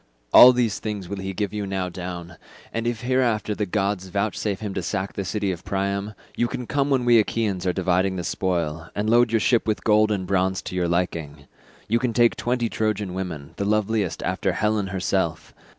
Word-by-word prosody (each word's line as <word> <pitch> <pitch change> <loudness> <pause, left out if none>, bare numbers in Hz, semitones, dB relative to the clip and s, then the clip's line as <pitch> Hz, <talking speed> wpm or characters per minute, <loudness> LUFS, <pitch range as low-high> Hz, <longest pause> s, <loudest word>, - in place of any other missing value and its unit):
All 125 - +11
these 120 -4 0
things 105 -4 -4
will 100 +1 -5
he 95 0 -4
give 100 0 -3
you 105 -1 -3
now 95 -1 -2
down, 90 -1 -7 0.4
and 115 +1 -2
if 120 -2 -2
hereafter 120 -4 +1
the 105 0 -2
gods 100 -1 -1
vouchsafe 100 +1 -2
him 105 -3 -4
to 95 - -2
sack 95 +2 -3
the 100 - -3
city 100 +1 -1
of 85 -2 -6
Priam, 100 +1 -2 0.2
you 120 - +1
can 125 +1 -5
come 140 +3 0
when 130 -3 +2
we 120 -1 +6
Achaeans 105 -4 -1
are - - +3
dividing 95 +1 +1
the 90 - -3
spoil, 85 -4 -2
and 105 +1 -1
load 120 +1 +4
your 115 - +3
ship 115 +1 +2
with 110 - -1
gold 110 0 +4
and 95 -3 -1
bronze 95 0 0
to - - -6
your 90 -1 +1
liking. 85 -4 -2 0.4
You 115 +2 +2
can 120 -1 -1
take 120 0 +4
twenty 120 -1 -1
Trojan 105 -4 -2
women, 85 -7 -5
the 100 - -1
loveliest 105 -4 0
after 95 0 -1
Helen 105 +1 0
herself. 95 -2 -2
100 Hz, 205 wpm, -24 LUFS, 90-110 Hz, 0.4 s, All